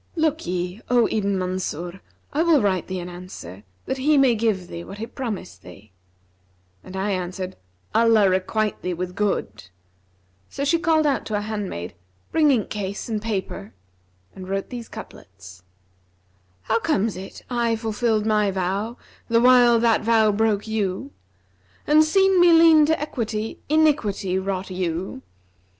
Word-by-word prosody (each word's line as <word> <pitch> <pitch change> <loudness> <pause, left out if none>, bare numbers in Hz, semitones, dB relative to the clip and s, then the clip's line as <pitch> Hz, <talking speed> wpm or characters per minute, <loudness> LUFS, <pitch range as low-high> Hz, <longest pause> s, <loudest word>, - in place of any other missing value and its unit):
'Look'ye, 195 - -1
O 245 -2 +4
Ibn 200 -2 0
Mansur, 180 -1 -4 0.3
I 300 - +1
will 330 -3 +4
write 190 -5 0
thee 185 -1 -4
an 175 - -6
answer, 175 - -10 0.2
that 265 - -3
he 295 +3 +3
may 270 -3 +5
give 210 -5 0
thee 170 -1 -7
what 195 - -10
he 220 - -4
promised 225 - -6
thee.' 95 +3 -14 0.9
And 185 - -10
I 200 +2 -1
answered, 185 0 -4 0.4
'Allah 225 -3 +5
requite 190 +3 0
thee 180 -1 -2
with 180 +1 -4
good!' 110 - -2 0.8
So 280 - -3
she 335 +4 +2
called 320 -2 +2
out 280 -2 +1
to 215 - -2
a 205 - 0
handmaid, 205 - -5 0.4
'Bring 310 -2 +4
inkcase 210 -5 -2
and 215 -2 -2
paper,' 190 - -4 0.6
and 185 -1 -9
wrote 195 +4 -3
these 240 -2 -7
couplets, 95 - -12 1.0
'How 225 - +1
comes 225 -7 0
it 190 +1 -9
I 235 -2 0
fulfilled 220 -1 0
my 210 -2 +2
vow 195 +5 -2 0.3
the 230 -1 +3
while 245 -1 +6
that 230 -1 +3
vow 220 -1 +3
broke 210 0 +1
you? 195 -8 -2 0.4
* 95 0 -35
And, 305 +1 +5
seen 385 +3 +3
me 350 -1 +7
lean 325 -2 +7
to 320 0 +1
equity, 225 -6 -4
iniquity 240 -12 +2
wrought 190 0 -3
you? 180 -4 -3
210 Hz, 150 wpm, -23 LUFS, 185-240 Hz, 1.0 s, me